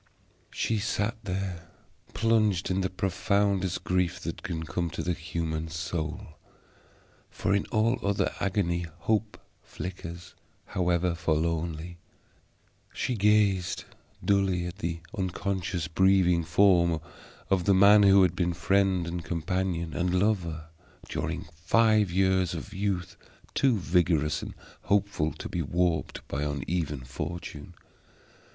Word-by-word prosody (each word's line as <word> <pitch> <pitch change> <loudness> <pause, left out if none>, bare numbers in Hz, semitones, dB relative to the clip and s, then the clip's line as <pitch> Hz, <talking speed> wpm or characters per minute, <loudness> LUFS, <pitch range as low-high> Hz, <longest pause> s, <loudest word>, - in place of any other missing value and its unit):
She 110 -2 -1
sat 105 +2 -1
there 90 -3 -4 0.5
plunged 105 -3 +2
in 95 +1 +1
the 95 - 0
profoundest 95 0 0
grief 90 0 0
that - - -5
can 80 -1 -4
come 85 +3 -2
to 80 - -4
the 90 - 0
human 80 -1 -3
soul, 80 +2 -5 0.9
for 95 - -1
in 100 - +1
all 115 +3 +1
other 100 -2 0
agony 90 -3 0
hope 110 +2 0 0.2
flickers, 85 -1 -8 0.3
however 90 -2 +1
forlornly. 85 0 -1 0.9
She 125 - -2
gazed 105 -4 +2 0.4
dully 95 -3 +2
at 90 +1 -6
the 85 0 -3
unconscious 95 -3 -2
breathing 90 0 +3
form 85 -1 +4 0.5
of 90 -3 +2
the 100 - +5
man 100 +2 +7
who 100 -1 +7
had 90 -1 +2
been 90 -1 0
friend, 95 +1 +2
and 85 0 -4
companion, 85 +1 -2
and 90 +1 +1
lover, 85 -6 -1 0.4
during - - -3
five 105 +5 +3
years 95 -1 +2
of 80 - -7
youth 95 -3 -2 0.4
too 130 -5 +3
vigorous 80 -5 +1
and - - -7 0.3
hopeful 100 -6 +1
to - - -7
be 90 - -2
warped 85 +2 -1
by 70 - -3
uneven 75 0 -2
fortune. 75 +5 -6
90 Hz, 120 wpm, -28 LUFS, 85-100 Hz, 0.9 s, man